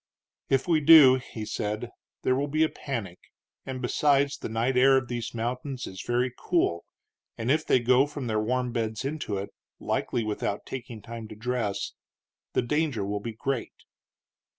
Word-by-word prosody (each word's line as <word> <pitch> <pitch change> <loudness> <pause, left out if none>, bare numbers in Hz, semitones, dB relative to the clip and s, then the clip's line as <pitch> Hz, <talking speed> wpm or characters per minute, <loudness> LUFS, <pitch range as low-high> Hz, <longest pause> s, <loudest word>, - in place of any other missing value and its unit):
"If 135 +3 +2
we 165 -3 +4
do," 145 -4 +9
he 110 -2 -7
said, 105 +3 -3 0.3
"there 130 - +3
will 140 +2 0
be 155 +2 +2
a 160 - +2
panic; 110 -10 -5 0.5
and, 130 -1 -5
besides, 140 +2 +2
the - - -6
night 115 +4 0
air 135 +1 +6
of 130 -2 -2
these 120 -1 -4
mountains 125 +3 -3
is 95 -1 -7
very 120 +3 0
cool, 125 - 0 0.5
and 115 +3 0
if 155 +2 +2
they - - +5
go 125 +3 +4
from 145 -2 -6
their 110 -2 0
warm 125 +2 0
beds 110 0 -2
into 140 -8 -3
it, 100 +1 -5 0.3
likely 120 - -1
without 105 -1 -3
taking 120 -4 -7
time 115 -1 -7
to 110 - -10
dress, 115 -2 -2 0.6
the - - +2
danger 140 -5 0
will 100 +1 -2
be 115 +2 -5
great." 135 +2 -3
125 Hz, 175 wpm, -27 LUFS, 110-135 Hz, 0.6 s, do